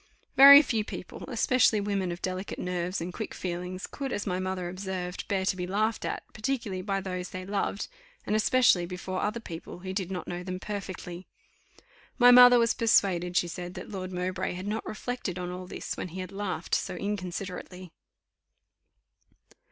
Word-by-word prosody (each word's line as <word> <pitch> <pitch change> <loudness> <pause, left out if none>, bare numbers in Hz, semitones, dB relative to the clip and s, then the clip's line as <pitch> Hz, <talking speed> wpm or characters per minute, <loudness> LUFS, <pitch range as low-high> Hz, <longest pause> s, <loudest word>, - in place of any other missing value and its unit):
Very 280 +2 +11
few 225 -6 0
people, 185 - -8
especially 245 -2 +3
women 200 -3 -1
of 175 - -7
delicate 185 +1 -3
nerves 180 0 -2
and 175 +2 -4
quick 220 - -5
feelings, 180 +1 -4
could, 275 -2 -5
as 205 - -2
my 180 -2 -1
mother 185 -1 -2
observed, 185 -1 -5
bear 190 -2 0
to 190 - +1
be 180 -1 -4
laughed 215 +4 0
at; - - -3
particularly 220 -5 -2
by 195 0 -1
those 185 -1 -4
they 185 0 -6
loved; 200 0 -2 0.4
and 210 - 0
especially 215 -5 +4
before 185 +1 -4
other 215 +3 -1
people 175 -3 -8
who 190 0 -5
did 190 -2 -2
not 185 -2 -5
know 175 0 -4
them 185 0 -5
perfectly. 185 -3 -6 0.9
My 245 -1 +8
mother 245 0 +9
was 230 -1 +3
persuaded, 180 -6 +2
she 175 - +3
said, 175 +1 -6
that - - -8
Lord 185 -2 -5
Mowbray 180 0 -2
had 185 +2 -6
not 210 +2 -3
reflected 215 -5 -4
on 180 -1 -4
all 180 0 -7
this - - -5
when - - -4
he 180 +2 -8
had 185 - -7
laughed 200 -1 -4
so - - 0
inconsiderately. 185 -2 -5
185 Hz, 175 wpm, -28 LUFS, 180-210 Hz, 0.9 s, Very